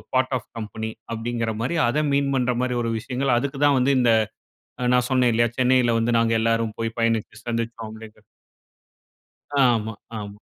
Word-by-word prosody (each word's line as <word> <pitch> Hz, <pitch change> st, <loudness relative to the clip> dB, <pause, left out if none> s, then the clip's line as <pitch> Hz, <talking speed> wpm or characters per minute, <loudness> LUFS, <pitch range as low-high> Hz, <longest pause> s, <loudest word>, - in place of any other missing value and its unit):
Part 130 Hz, +1 st, +2 dB
of 110 Hz, -, -12 dB
company" 110 Hz, 0 st, -5 dB, 0.2 s
அப்டீங்குற 115 Hz, 0 st, -2 dB
மாரி 135 Hz, +8 st, -1 dB
அத 150 Hz, +5 st, +1 dB
மீன் 140 Hz, 0 st, +1 dB
பண்ற 125 Hz, -1 st, +1 dB
மாரி 125 Hz, -1 st, -1 dB
ஒரு 115 Hz, -, -1 dB
விஷயங்கள 130 Hz, +3 st, -1 dB
அதுக்கு 135 Hz, +1 st, -4 dB
தான் 145 Hz, -2 st, +4 dB
வந்து 135 Hz, +2 st, +3 dB
இந்த 120 Hz, -2 st, +4 dB, 0.8 s
நான் 125 Hz, -, +5 dB
அ 125 Hz, -, -4 dB
சொன்னேன் 125 Hz, -2 st, +3 dB
இல்லயா? 120 Hz, 0 st, +2 dB
சென்னையில 125 Hz, -2 st, +3 dB
வந்து 115 Hz, +1 st, +2 dB
நாங்க 115 Hz, 0 st, +2 dB
எல்லாரும் 115 Hz, -1 st, 0 dB
போயி 115 Hz, 0 st, -1 dB
பயணித்து 115 Hz, -1 st, -1 dB
சந்திச்சோம் 115 Hz, -1 st, -3 dB
அப்டீங்கிறது. 110 Hz, -1 st, -12 dB, 1.3 s
அ -, -, 0 dB, 0.2 s
ஆமா. 110 Hz, 0 st, -3 dB, 0.3 s
ஆமா. 100 Hz, 0 st, -8 dB
115 Hz, 170 wpm, -23 LUFS, 115-125 Hz, 1.3 s, நான்